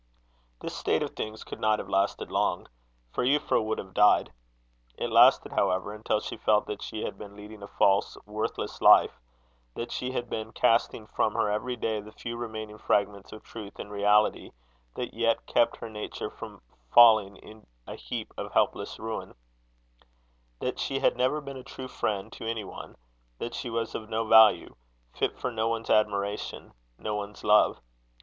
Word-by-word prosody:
This - - -5
state - - 0
of - - -4
things 110 0 -6
could - - -9
not 110 0 +2
have - - -6
lasted 95 +1 0
long; - - 0 0.5
for - - -1
Euphra 135 -3 +2
would 110 0 -2
have 95 -1 -8
died. 105 -10 +4 0.6
It - - -3
lasted, - - +6
however, 95 +3 0
until 105 0 -1
she - - -6
felt 105 -1 +2
that 105 - -6
she 110 - -5
had - - -5
been 100 -1 -10
leading 105 0 -11
a 100 - -8
false, 100 0 +2
worthless 105 +1 -4
life; - - +6 0.6
that 115 - -5
she 125 - -3
had 120 -1 -2
been 110 0 -5
casting 115 -1 +2
from 105 0 -1
her 105 - +1
every 125 +4 -2
day 110 -2 -2
the 105 +1 -12
few 115 +2 -6
remaining 110 -2 -6
fragments 100 -1 0
of 110 - -10
truth 105 -3 -10
and 105 - -8
reality 105 +1 +2 0.4
that 125 - -4
yet 115 0 0
kept 120 - +2
her - - -7
nature 105 -1 -5
from - - -10 0.3
falling 110 -4 +7
in 110 +2 -15 0.2
a - - -7
heap - - -6
of - - -5
helpless - - 0
ruin; 110 0 -6 1.2
that 125 - -3
she 135 - -1
had - - +2
never 130 +4 +1
been 140 -2 -8
a 130 - -9
true 130 +1 -8
friend 100 -5 -3
to 115 - -7
any 115 -2 -3
one; - - -10 0.4
that 120 - -5
she 130 -1 -4
was 115 0 -2
of 110 -1 -6
no 115 0 -1
value 110 0 +6 0.4
fit - - -1
for 125 - -3
no 110 -1 -1
one's 115 0 -2
admiration, 105 -1 0 0.2
no 105 - -4
one's 105 0 -6
love. 105 0 +4
110 Hz, 180 wpm, -28 LUFS, 105-115 Hz, 1.2 s, falling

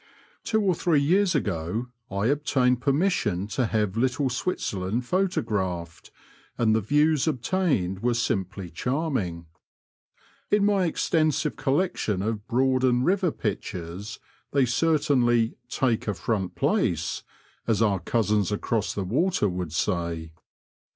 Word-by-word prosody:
Two 220 -1 +1
or 190 -2 +3
three 165 -2 +2
years 180 +5 +3
ago 105 - -2 0.2
I 100 -1 -1
obtained 130 -2 +2
permission 135 - +1
to 115 +3 0
have 105 -3 0
Little 130 +3 +1
Switzerland 115 - -2
photographed, 100 - -2 0.5
and 110 -2 +3
the 110 - +2
views 150 +5 +2
obtained 135 - 0
were 120 0 +1
simply 95 -5 -2
charming. 125 - -2 1.0
In 210 -1 +3
my 200 -3 +3
extensive 155 -2 +1
collection 135 - 0
of 110 0 -3
Broad 130 +1 +2
and 125 0 +3
River 185 -1 +2
pictures 100 -2 -5 0.4
they 140 -2 +4
certainly 125 -4 +2
" 120 - -45
take 120 -5 +1
a 105 - 0
front 95 -2 -2
place," - - 0 0.5
as 110 -4 +2
our 100 -4 +2
cousins 105 +1 +1
across 105 +1 -1
the 100 - -1
water 130 - +1
would 90 -4 -3
say. 85 -2 -2
120 Hz, 125 wpm, -26 LUFS, 100-145 Hz, 1.0 s, they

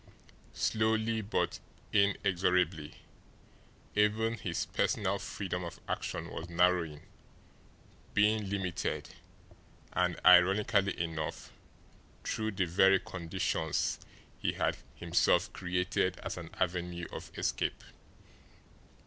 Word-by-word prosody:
Slowly, 110 0 +1
but 105 +1 -1 0.3
inexorably, 90 -5 +2 1.0
even 105 +2 +2
his 90 -7 -3
personal 100 0 0
freedom 95 -3 -4
of 85 - -7
action - - -3
was 85 - -6
narrowing, 85 -3 +2 1.1
being 105 0 +3
limited, 95 -3 -2 0.8
and, 90 -2 +1
ironically 100 +3 +5
enough, 80 -2 -3 0.7
through 110 0 -2
the 95 -1 +1
very 95 +3 +5
conditions 80 -3 -1 0.4
he - - 0
had - - 0 0.2
himself - - +2
created 90 0 0
as - - -3
an 85 -2 -7
avenue 85 -1 -2
of - - -7
escape. - - -1
90 Hz, 90 wpm, -32 LUFS, 85-100 Hz, 1.1 s, ironically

